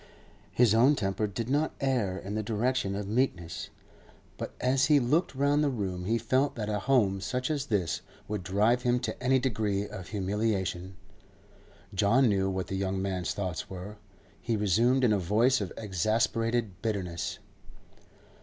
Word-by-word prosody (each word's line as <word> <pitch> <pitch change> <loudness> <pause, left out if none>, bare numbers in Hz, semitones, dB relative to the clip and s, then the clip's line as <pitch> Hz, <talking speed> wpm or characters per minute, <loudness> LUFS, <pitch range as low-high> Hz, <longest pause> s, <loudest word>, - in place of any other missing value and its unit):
His 120 -3 +4
own 125 +6 +5
temper 100 -2 -1
did 110 +3 -4
not 145 +4 0
err 120 -9 0
in 100 +1 -6
the 110 - -1
direction 110 -1 0
of 100 0 -4
meekness, 100 -8 -1 0.7
but - - -5
as 130 +1 +2
he 150 -2 +5
looked 140 +5 +1
round 145 +2 +2
the 145 - +2
room 95 -8 -3
he 115 +4 +1
felt 130 +5 +1
that 110 -2 -3
a 105 -1 0
home 105 -6 +2
such 125 +7 -2
as 145 -2 -2
this 100 - 0 0.3
would 105 -2 -3
drive 105 +7 +2
him 125 0 +2
to 125 - -4
any 130 +1 +4
degree 105 -5 -1
of 95 -4 -8
humiliation. 95 -2 -2 1.0
John 110 +7 +4
knew 95 -2 +1
what 95 -1 -2
the 95 - -4
young 95 0 -1
man's 95 -2 -2
thoughts 90 -5 -4
were; 95 +3 -8 0.4
he 115 - -1
resumed 115 +6 +3
in 115 -4 +4
a 100 - +2
voice 110 +8 +2
of 95 - -4
exasperated 110 +1 0
bitterness. 90 -6 -3
110 Hz, 165 wpm, -29 LUFS, 95-125 Hz, 1.0 s, own